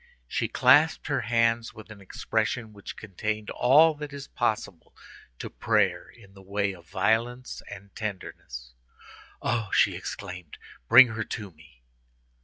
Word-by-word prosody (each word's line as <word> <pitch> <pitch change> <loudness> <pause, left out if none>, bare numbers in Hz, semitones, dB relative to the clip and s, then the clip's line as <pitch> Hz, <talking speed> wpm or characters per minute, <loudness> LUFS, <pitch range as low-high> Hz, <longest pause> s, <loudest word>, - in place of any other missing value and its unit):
She - - -1
clasped 160 +2 +4
her 140 -2 +1
hands 115 0 +1
with 110 0 -12
an 105 -2 -12
expression 110 +3 -2
which 100 -1 -10
contained 110 +1 -4
all 155 +6 +5
that 150 -1 -8
is 140 -1 -8
possible 110 -7 -3 0.4
to - - -6
prayer - - 0
in 100 -5 -18
the 95 - -15
way 100 +1 -2
of 85 -2 -16
violence 115 +6 -1
and 100 -1 -11
tenderness. 60 - -7 0.7
"Oh!" 115 -3 -1
she - - +4
exclaimed, 90 -4 -7 0.3
"bring 125 0 +9
her 110 -1 -3
to 105 -2 -6
me!" 80 -6 -21
110 Hz, 140 wpm, -27 LUFS, 95-120 Hz, 0.7 s, bring